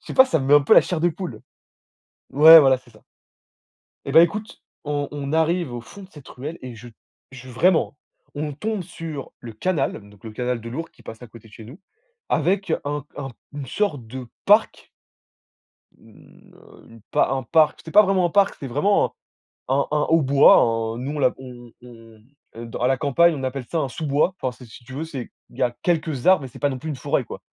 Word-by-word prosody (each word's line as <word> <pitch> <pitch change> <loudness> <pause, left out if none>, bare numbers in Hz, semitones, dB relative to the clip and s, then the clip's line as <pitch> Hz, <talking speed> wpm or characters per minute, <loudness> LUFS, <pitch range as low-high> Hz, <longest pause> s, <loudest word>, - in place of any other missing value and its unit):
Je - - -26
sais - - -7
pas. 260 - +8
Ça 260 -11 0
me 135 - -4
met 145 - +5
un 145 - +7
peu - - +4
la - - +9
chair 175 -3 -3
de 175 - +3
poule. 165 - -7 0.9
Ouais, 160 +4 +9
voilà, 135 -2 +4
c'est 125 -1 -21
ça. 110 - -21 1.0
Eh, 140 - -4
bah, 160 +4 +8
écoute, 210 +7 -2 0.2
on 145 -1 -3
on 140 -1 -5
arrive 160 -3 0
au 120 - -5
fond 200 - -13
de 190 - -15
cette 150 -6 -15
ruelle 150 +6 -8
et 125 -2 -9
je 120 +2 -12 0.4
je 130 -1 -12
vraiment, 160 +4 +1 0.3
hein, - - -38
on 150 0 -4
tombe 210 +6 -3
sur 155 -4 -8
le 115 -2 -10
canal 135 - -2
donc 105 0 -21
le 110 - -7
canal 125 +1 -3
de 115 - -9
l'Ourcq 165 +7 -6
qui - - -22
passe 110 +2 -10
à 125 - -10
côté 115 0 -16
de 105 - -21
chez 110 - -12
nous, 130 - -13 0.5
avec 185 +3 0
un 145 -1 -4
un 135 -2 -5 0.2
une 145 -2 -6
sorte 145 - -2
de 125 +2 -8 0.2
parc - - +2 1.1
une, - - -20
heu, - - -19
une 115 -1 -16
un 135 -1 +1
parc, 155 +5 +2
c'était 160 - -11
pas 210 - +8
vraiment 190 -2 +1
un - - 0
parc, 200 +1 +2
c'est 135 - -6
vraiment 150 +11 +2
un - - -8 0.6
un 135 +2 +1
un 150 0 +1
haut 165 -1 +3
bois, 135 +1 +6 0.4
un - - -8
nous, 135 +3 -4
on - - -4
l'a 130 -3 +2
on 120 -2 -12
on 125 - -13 0.3
mmh, 110 - -24 0.3
heu, 115 +1 -8
dans 115 - -8
à 125 - +1
la 135 - +2
campagne, 160 +5 +3
on 140 - -6
appelle 130 -1 -4
ça 165 - -1
un 140 - -1
sous-bois. 150 +7 0
Enfin, 130 - -2
c'est, 125 - -14
si 120 - -14
tu 130 - -13
veux, 145 +5 -4
c'est 135 -7 -7 0.2
il - - -18
y - - -1
a 120 - +1
quelques 155 -6 -1
arbres 185 -5 +5
mais 130 - -7
c'est - - -14
pas 145 - +2
non 130 - -5
plus 155 +4 -6
une 145 - -4
forêt, - - -1
quoi. - - -9
140 Hz, 235 wpm, -22 LUFS, 125-165 Hz, 1.1 s, la